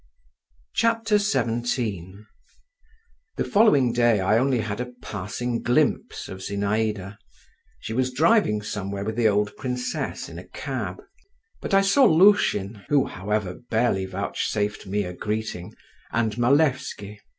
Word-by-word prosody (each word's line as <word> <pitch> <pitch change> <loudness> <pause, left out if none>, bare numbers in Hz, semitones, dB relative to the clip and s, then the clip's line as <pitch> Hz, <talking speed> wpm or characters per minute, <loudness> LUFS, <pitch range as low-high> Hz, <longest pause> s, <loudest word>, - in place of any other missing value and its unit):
XVII 120 - 0 1.1
The - - 0
following 145 - +4
day 120 -3 +3
I 100 +4 +3
only 130 0 +2
had 110 +2 -3
a 125 0 -6
passing 110 +5 -4
glimpse 120 +1 0
of 95 - -8
Zinaïda: 100 0 -2 0.6
she 110 - -6
was 130 +2 0
driving 145 - +3
somewhere 100 -1 -4
with 110 +1 -3
the 115 -1 +3
old 105 0 +1
princess 125 -1 -3
in - - -9
a - - -12
cab. - - -5 0.6
But 195 - 0
I 195 - +6
saw 195 +8 +4
Lushin, 155 - +4
who, 145 -2 +3
however, 100 -1 -2 0.2
barely 110 -5 +1
vouchsafed 105 +2 -2
me 100 +2 0
a 90 -1 -6
greeting, 105 -2 -4 0.4
and 110 -3 0
Malevsky. 125 -5 +1
110 Hz, 125 wpm, -24 LUFS, 100-130 Hz, 1.1 s, I